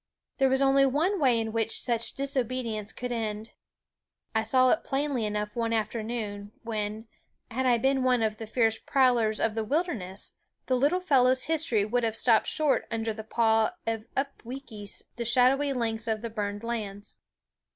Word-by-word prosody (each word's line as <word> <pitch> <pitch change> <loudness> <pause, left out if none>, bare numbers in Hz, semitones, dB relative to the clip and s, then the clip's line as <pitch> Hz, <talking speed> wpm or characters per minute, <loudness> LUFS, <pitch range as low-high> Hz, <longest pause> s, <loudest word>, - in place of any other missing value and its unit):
There 270 -1 +4
was 265 +1 +2
only 275 0 +5
one 315 +9 +1
way 255 -6 +3
in 225 -1 -2
which 225 0 -1
such 235 -2 0
disobedience 255 -5 -2
could 250 0 -6
end. 220 -1 -3 0.8
I 220 - +2
saw 255 +3 +4
it 320 - +1
plainly 270 -5 -1
enough 210 0 -3
one 230 -1 -1
afternoon, 215 -2 -3
when, 215 0 -4 0.4
had 260 +3 0
I 240 -1 +4
been 265 +2 +1
one 250 -2 +2
of 215 -1 -1
the 225 - -7
fierce 225 -1 +1
prowlers 240 -5 +2
of 225 - +1
the 225 0 -2
wilderness, 220 - -2 0.3
the 260 - -1
little 290 +9 +2
fellow's 260 -6 +4
history 305 -10 +2
would 245 +3 0
have 225 -1 0
stopped 225 -2 +4
short 305 -3 +1
under 225 -1 -2
the 220 0 -7
paw 225 +5 +2
of 225 -1 -2
Upweekis, 250 -6 -5
the 240 - -2
shadowy 255 +4 +3
lynx 230 -3 -1
of 220 0 -1
the 230 - -4
burned 205 -1 -4
lands. 210 -4 -5
230 Hz, 170 wpm, -28 LUFS, 220-260 Hz, 0.8 s, only